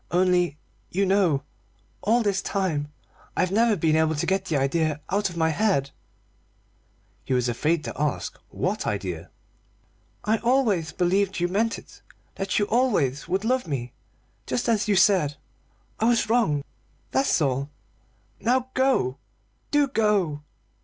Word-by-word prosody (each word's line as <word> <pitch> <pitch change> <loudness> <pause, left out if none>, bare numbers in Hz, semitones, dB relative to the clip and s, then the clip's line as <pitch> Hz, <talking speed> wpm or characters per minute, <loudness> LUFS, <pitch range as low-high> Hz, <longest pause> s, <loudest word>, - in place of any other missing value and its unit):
Only, 180 -3 +2 0.3
you 195 +2 +1
know, 185 -8 +2 0.6
all 230 +3 +2
this 200 -2 +1
time 155 -7 -2 0.5
I've 185 - +1
never 225 +2 +3
been 160 -3 +2
able 160 0 +2
to 155 +4 -1
get 190 +1 0
the 160 -5 0
idea 150 +2 0
out 200 +1 +1
of 175 - -9
my 160 -1 +2
head 160 -6 +1 0.6
" - - -39
He 130 - -1
was 125 -1 +1
afraid 155 +7 0
to - - -5
ask 150 -1 -2
what - - -2
idea. 90 -5 -3 0.9
"I 220 +1 +1
always 230 - +1
believed 190 +2 +1
you 175 - +1
meant 220 +5 0
it; - - -15 0.3
that 195 -1 -2
you 205 - +3
always 205 - +1
would 190 +4 -1
love 255 -1 +1
me, 125 -5 -4 0.5
just 245 - -1
as 220 -3 +2
you 205 - +3
said. 180 -7 +4 0.6
I 220 - +1
was 230 -1 +2
wrong, 195 -13 +2 0.5
that's 270 - +2
all. 140 -1 0 0.7
Now 255 +2 +1
go! 255 - +1 0.5
Do 290 -1 +3
go!" 205 - +1
185 Hz, 145 wpm, -25 LUFS, 150-215 Hz, 0.9 s, said